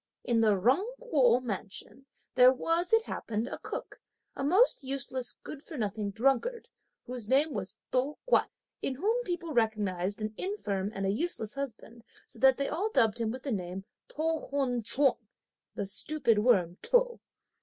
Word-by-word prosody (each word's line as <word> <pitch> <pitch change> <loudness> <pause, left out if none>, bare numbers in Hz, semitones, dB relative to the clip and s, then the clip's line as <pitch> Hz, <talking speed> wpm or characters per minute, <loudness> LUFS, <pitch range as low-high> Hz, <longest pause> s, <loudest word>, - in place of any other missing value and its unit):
In 235 -2 +1
the 210 -3 +3
Jung 275 - +2
Kuo 255 - +3
mansion, 220 +4 -6 0.3
there 255 0 +7
was, 330 +6 0
it 450 0 +5
happened, 225 - -3
a - - -6
cook, - - -7 0.3
a - - -4
most 370 - +4
useless, 260 -2 -3
good 290 - -8
for 315 0 -9
nothing 210 -2 -2
drunkard, 270 - 0 0.4
whose 245 -4 -5
name 280 +5 +3
was 195 -4 -5
To 265 +4 0
Kuan, - - +3 0.3
in 265 - -1
whom 440 - 0
people 345 -3 -3
recognised 205 -5 0
an 215 0 -3
infirm 205 - -2
and 195 0 -2
a 195 - +2
useless 220 - 0
husband 240 -4 -7 0.2
so 235 - -12
that 265 +1 +6
they 280 0 -1
all 410 +6 -1
dubbed 235 - +3
him 225 - 0
with 255 +3 -6
the 275 - -3
name 190 -2 -4 0.2
of - - -18
To 320 +1 -1
Hun 265 -4 0
Ch'ung, 265 +4 +2 0.6
the - - -2
stupid 235 +2 +1
worm 190 -7 +2
To. - - +2
255 Hz, 170 wpm, -30 LUFS, 215-305 Hz, 0.6 s, there